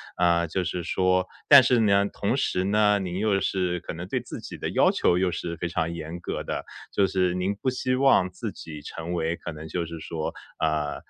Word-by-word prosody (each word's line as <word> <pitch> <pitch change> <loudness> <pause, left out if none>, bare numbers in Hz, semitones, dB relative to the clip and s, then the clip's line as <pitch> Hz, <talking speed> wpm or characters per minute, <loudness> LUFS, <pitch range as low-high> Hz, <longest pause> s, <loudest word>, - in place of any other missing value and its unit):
啊， 85 -1 +2
就 90 +3 -1
是 90 0 -3
说 95 +1 +1 0.2
但 140 -2 +10
是 125 0 +3
呢， 100 -2 +4
同 - - -1
时 90 - 0
呢， 105 +1 +3
您 95 -2 -3
又 105 -2 +2
是 90 -2 -1
可 - - -6
能 85 +2 -7
对 - - -1
自 - - -8
己 - - -8
的 - - -3
要 - - +4
求 90 - +2
又 90 -1 +1
是 85 0 -4
非 85 - -2
常 85 0 -1
严 85 +1 -6
格 - - -4
的。 - - -4 0.3
就 100 - +3
是 90 -1 +1
您 90 +2 0
不 130 - -1
希 130 0 -1
望 130 -9 +4
自 105 +3 -5
己 75 -2 -9
成 85 +4 -6
为 85 -1 0
可 85 - -7
能 80 +1 -8
就 85 +2 -2
是 85 0 -7
说， 80 0 -4 0.3
呃， 75 -2 0
90 Hz, 240 characters per minute, -26 LUFS, 85-100 Hz, 0.3 s, 但